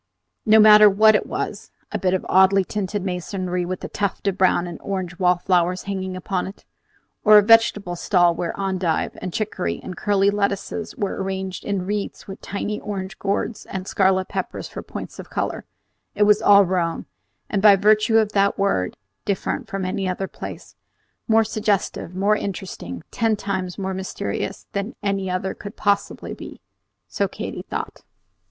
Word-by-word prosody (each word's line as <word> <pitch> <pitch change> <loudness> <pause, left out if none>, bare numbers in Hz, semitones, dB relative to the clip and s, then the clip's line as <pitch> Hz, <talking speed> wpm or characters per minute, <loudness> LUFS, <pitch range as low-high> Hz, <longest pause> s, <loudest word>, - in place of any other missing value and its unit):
No 215 +1 +7
matter 210 -1 +9
what 215 +2 +5
it 210 - +1
was, - - -4 0.2
a - - -2
bit 185 0 +1
of 185 - -3
oddly 190 +1 +5
tinted 205 0 -3
masonry 180 -1 -3
with 185 0 -5
a - - -3
tuft 200 0 -3
of 195 - +1
brown 185 -2 +3
and 175 -1 -7
orange 185 -3 -4
wallflowers 180 0 +2
hanging 190 -2 -4
upon 185 0 -2
it, 195 - -11 0.6
or 215 0 +8
a 210 - +7
vegetable 210 -4 +4
stall 175 -1 +3
where 170 +2 -4
endive 185 -4 -1
and 185 - -4
chiccory 205 -1 -2
and 185 - -6
curly 200 +1 +2
lettuces 200 +1 -2
were 200 - -3
arranged 190 -1 -4
in 200 -3 -2
wreaths 205 +1 -4
with 195 - -9
tiny 205 +1 -4
orange 195 -2 -6
gourds 200 +3 -2
and 190 0 -5
scarlet 190 -1 +2
peppers - - -4
for - - -7
points - - -8
of - - -9
color, - - -3 0.5
it 210 - +3
was 210 +1 +5
all 200 -1 +7
Rome, 175 -2 -1 0.4
and, 200 -3 -1
by 205 -1 +8
virtue 215 +3 +4
of 215 -2 +2
that 200 -1 +2
word, 195 - 0 0.3
different 200 -2 -2
from 195 -3 -3
any 185 +1 -2
other 190 +1 -2
place, - - -9 0.5
more 225 0 +5
suggestive, 210 -5 -1
more 200 +3 +3
interesting, 180 - -5
ten 225 -1 +1
times 190 -3 -4
more 190 -1 -3
mysterious 190 0 -4
than 200 +4 -3
any 195 -2 -1
other 185 +1 -2
could 205 0 -9
possibly 200 0 -1
be, - - -10 0.5
so - - -1
Katy - - -6
thought. - - -6
195 Hz, 170 wpm, -22 LUFS, 185-205 Hz, 0.6 s, matter